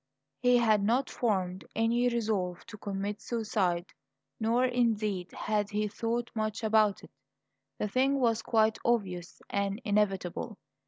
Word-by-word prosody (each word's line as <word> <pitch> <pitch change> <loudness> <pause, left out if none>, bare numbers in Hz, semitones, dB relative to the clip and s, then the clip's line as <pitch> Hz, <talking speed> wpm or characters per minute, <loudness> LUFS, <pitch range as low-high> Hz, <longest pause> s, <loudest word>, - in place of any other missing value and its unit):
He 250 -1 +5
had 220 -3 +4
not 245 +6 +1
formed 190 -5 -1
any 235 +2 +2
resolve 210 -7 -1
to 215 - -10
commit 200 +1 -3
suicide, 200 -7 0 0.5
nor 235 +3 +2
indeed 215 -7 0
had 210 -1 -1
he 210 0 0
thought 230 +3 -2
much 215 0 -2
about 215 -2 +3
it; - - -13 0.7
the 210 - -1
thing 265 +6 +2
was 230 -3 +2
quite 220 -1 +2
obvious 185 -7 -1
and 200 +1 -1
inevitable. 205 0 0
215 Hz, 130 wpm, -30 LUFS, 200-235 Hz, 0.7 s, He